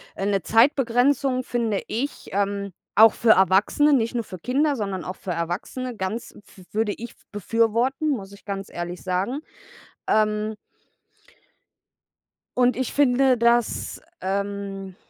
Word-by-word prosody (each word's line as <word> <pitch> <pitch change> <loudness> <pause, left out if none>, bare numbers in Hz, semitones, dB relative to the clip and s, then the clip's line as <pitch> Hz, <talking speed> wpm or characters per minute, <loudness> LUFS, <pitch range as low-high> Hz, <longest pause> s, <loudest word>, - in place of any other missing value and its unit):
äh, 195 - -3
'ne 200 -1 +1
Zeitbegrenzung 255 +2 +3
finde 230 -5 -1
ich, 265 +6 -4
ähm, 200 -1 -1 0.2
auch 220 +1 +8
für 230 -2 +4
Erwachsene, 200 - +4
nicht 230 -3 +2
nur 235 - 0
für 185 - -9
Kinder, 280 - +1
sondern 195 - -3
auch 185 +3 -5
für 185 - -6
Erwachsene 180 +9 -4
ganz 210 +4 -4
pf 185 - -16
würde 215 -1 0
ich 235 0 -8 0.2
befürworten, 230 +7 +1
muss 200 -8 -3
ich 200 - -16
ganz 195 -1 -5
ehrlich 175 +1 -6
sagen, 190 +9 -1 0.7
ähm 215 0 +1 2.0
und 250 0 +4
ich 260 -1 -2
finde 265 -2 +4
das, 235 0 +1 0.2
ähm 195 -1 -3
220 Hz, 130 wpm, -24 LUFS, 195-250 Hz, 2.0 s, auch